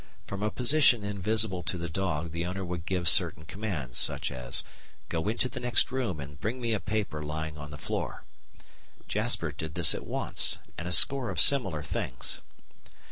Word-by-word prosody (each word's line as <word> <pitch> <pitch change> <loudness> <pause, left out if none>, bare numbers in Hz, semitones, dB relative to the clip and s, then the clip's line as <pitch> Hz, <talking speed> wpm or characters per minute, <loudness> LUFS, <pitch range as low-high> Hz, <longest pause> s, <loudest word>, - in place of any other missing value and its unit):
From 100 0 -6
a 105 - +1
position 125 -2 +4
invisible 100 -1 0
to 90 +2 -3
the 85 0 -4
dog 85 -2 -2
the 85 +1 -2
owner 95 +2 -4
would 90 0 -5
give 90 -2 -1
certain 80 -1 +5
commands, 80 - -3
such - - +3
as 60 -1 -1 0.5
"Go 80 +3 -2
into 115 +3 0
the 125 0 -7
next 125 0 +2
room 125 - -2
and 70 +1 -9
bring 115 +8 -3
me 120 -2 -1
a 105 - 0
paper 105 -9 -3
lying 75 +1 -4
on 75 0 -8
the 75 - -8
floor." - - -4 0.8
Jasper - - 0
did 80 0 -7
this 85 - +4
at - - -6
once, - - +1 0.2
and 85 - -6
a - - -3
score 130 +8 +5
of - - -2
similar 95 - +4
things. 60 -3 -1
90 Hz, 185 wpm, -29 LUFS, 80-110 Hz, 0.8 s, certain